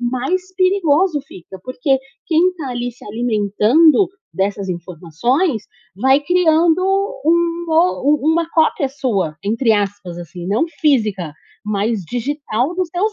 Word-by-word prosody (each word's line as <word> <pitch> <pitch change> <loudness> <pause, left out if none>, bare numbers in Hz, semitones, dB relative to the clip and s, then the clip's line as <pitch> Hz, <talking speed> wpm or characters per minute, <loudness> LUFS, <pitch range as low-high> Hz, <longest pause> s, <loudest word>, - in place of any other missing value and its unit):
mais 270 +10 -2
perigoso 370 -4 +2
fica, 190 +1 -12
porque 260 +1 0 0.3
quem 345 +3 +3
tá, 285 -5 -5
ali, 245 0 -3
se 250 - -23
alimentando 230 - +3 0.3
dessas 195 0 -2
informações, 185 - -1 0.3
vai 265 +6 +3
criando 335 +1 +3 0.4
um 340 +1 +1
o 320 -3 +3
u - - +3
uma 335 0 +1
cópia 315 -3 +2
sua, 205 - -2
entre 225 +3 +1
aspas, 200 -4 -2
assim, 175 +1 -8
não 210 - +1 0.2
física, 215 - +1 0.3
mas 210 0 -1
digital 255 - -2
dos 365 -3 -2
teus 410 +5 0
255 Hz, 130 wpm, -18 LUFS, 205-330 Hz, 0.4 s, quem